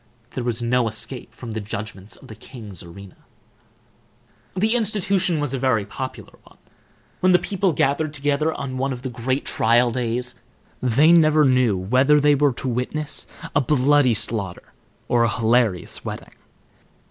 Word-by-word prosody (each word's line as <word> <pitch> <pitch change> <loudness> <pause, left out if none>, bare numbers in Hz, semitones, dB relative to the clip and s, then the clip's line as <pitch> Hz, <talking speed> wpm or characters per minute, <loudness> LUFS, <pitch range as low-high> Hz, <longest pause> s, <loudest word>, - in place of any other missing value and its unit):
There 125 - -4
was 120 -1 -2
no 120 0 +2
escape 110 +3 -5
from 120 -3 -9
the 110 - -3
judgments 100 -1 -7
of - - -16
the - - -9
king's 105 -4 -10
arena. 95 +2 -12 1.4
The 215 +4 +2
institution 195 -6 0
was 145 -3 -1
a 135 - -2
very 125 -6 +1
popular 130 +5 -8
one. - - -21 0.6
When 185 0 +4
the - - +7
people 195 0 0
gathered 145 +1 0
together 145 +2 0
on 130 -4 -5
one 135 +1 -1
of 125 0 -9
the 130 - -4
great 130 +4 -2
trial 120 +2 +2
days, 120 +1 -2 0.5
they 130 +6 +4
never 155 -3 +5
knew 125 -6 +3
whether 130 +10 +3
they 145 0 +4
were 145 0 +3
to 130 - -5
witness 130 +5 -3 0.3
a 145 - +3
bloody 140 -2 +3
slaughter 105 -4 -3 0.3
or 120 -1 +3
a 115 - +2
hilarious 115 -5 0
wedding. - - -7
125 Hz, 160 wpm, -22 LUFS, 115-145 Hz, 1.4 s, the